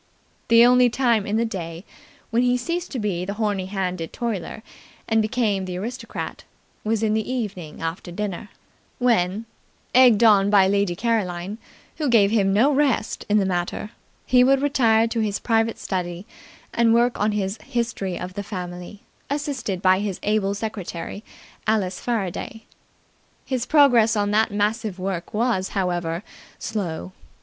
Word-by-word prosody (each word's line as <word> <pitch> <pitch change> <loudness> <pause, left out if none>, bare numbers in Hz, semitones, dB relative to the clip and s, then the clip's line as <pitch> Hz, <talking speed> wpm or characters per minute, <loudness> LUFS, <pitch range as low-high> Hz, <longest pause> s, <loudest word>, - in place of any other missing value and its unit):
The 230 +1 +7
only 250 0 +5
time 235 -4 +1
in 210 +2 0
the 230 - +1
day 170 -4 -6 0.5
when 230 +2 +2
he 250 0 +3
ceased 340 +8 -3
to 270 - -5
be 200 -6 -2
the 200 +2 -4
horny 205 -4 -1
handed 185 -4 -3
toiler 220 -2 -4 0.4
and 225 -1 +3
became 215 -4 0
the 180 -1 -5
aristocrat 235 +7 -6 0.4
was 220 0 0
in 215 -1 +2
the 220 +3 -1
evening 195 -12 -5
after 165 +2 -4
dinner, 205 +1 -4 0.5
when, 220 -4 +1 0.5
egged 245 -4 +6
on 205 -3 +6
by 200 -2 +5
Lady 200 -2 +1
Caroline, 200 -2 -2 0.4
who 300 -4 0
gave 210 -4 +5
him 200 -3 +2
no 230 +9 +4
rest 270 -6 0
in 210 - +4
the 200 - +2
matter 180 +3 -2 0.3
he 250 -1 +5
would 270 +2 +3
retire 230 -6 +3
to 230 0 -2
his 210 -2 0
private 225 -1 +1
study 180 -1 -4 0.5
and 230 -1 +4
work 240 +1 +2
on 210 +1 +1
his 200 0 -2
History 230 -8 -3
of 180 0 -6
the 205 - -4
Family, 180 -1 -7 0.3
assisted 270 - -3
by 185 0 +5
his 200 -2 -3
able 205 -1 +1
secretary, 200 -2 -5 0.4
Alice 195 -4 0
Faraday. 225 -1 -3 0.8
His 255 -2 -2
progress 245 -7 +5
on 205 -1 0
that 220 +2 +3
massive 210 0 -1
work 185 -2 -4
was, 215 -4 0
however, 175 -1 -1 0.3
slow. 185 -5 -4
210 Hz, 155 wpm, -23 LUFS, 190-235 Hz, 0.8 s, The